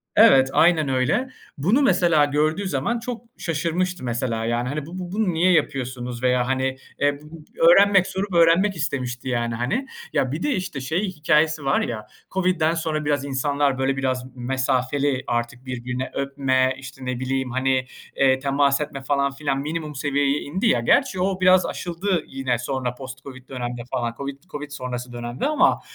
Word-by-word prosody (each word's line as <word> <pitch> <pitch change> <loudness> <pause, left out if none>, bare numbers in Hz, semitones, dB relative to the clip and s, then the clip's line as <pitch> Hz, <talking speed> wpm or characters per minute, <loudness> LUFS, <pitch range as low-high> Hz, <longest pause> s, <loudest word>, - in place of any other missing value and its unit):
Evet, 135 0 +7
aynen 160 -4 +4
öyle. 135 - +1 0.3
Bunu 195 - +2
mesela 170 - +4
gördüğü 155 +7 0
zaman 185 - -1
çok 230 0 -5 0.2
şaşırmıştı 170 +1 -2
mesela, 120 -2 -2
yani 120 +2 -1
hani 145 +1 -3
bu 180 +3 -8
bu 180 -1 -6
bunu 205 -3 0
niye 175 +3 +3
yapıyorsunuz 125 -6 -1
veya 125 0 +2
hani, 130 0 0 0.2
eee, 145 0 +2
bu 155 +1 -12 0.3
öğrenmek 195 0 +6
sorup 190 0 -3
öğrenmek 170 +4 +4
istemişti, 130 -5 -3
yani, 120 -2 -1
hani. 215 - -1 0.3
Ya, 130 - +1
bir 155 +5 -3
de 295 - +1
işte 180 -7 -4
şey 160 +10 -1
hikâyesi 155 -3 +1
var 135 - +2
ya, 110 -2 -4 0.2
COVID'den 180 -4 +1
sonra 160 -2 -2
biraz 145 -1 0
insanlar 140 0 0
böyle 135 +1 0
biraz 130 -1 -1
mesafeli 130 +2 0
artık 120 +2 -2
birbirine 125 0 -4
öpme, 135 -2 +1
işte, 130 -1 -10
ne 125 -1 -3
bileyim, 130 0 -2
hani, 130 0 +1 0.3
eee, 130 -1 +3
temas 140 +1 +2
etme 145 -2 -5
falan 140 0 +1
filan 140 0 -2
minimum 155 +1 -4
seviyeye 140 0 +1
indi 185 +11 -1
ya. - - +3
Gerçi 265 -9 +2
o 190 0 0
biraz 185 0 +5
aşıldı 175 0 -2
yine 135 -2 -1
sonra 125 0 -3
post 130 0 -9
COVID 130 -2 -11
dönemde 120 -2 -4
falan, 120 -1 -1
COVID 140 +1 -6
COVID 150 -5 -8
sonrası 125 -3 -5
dönemde 120 - -3
ama 305 - +3
140 Hz, 170 wpm, -23 LUFS, 130-165 Hz, 0.3 s, Evet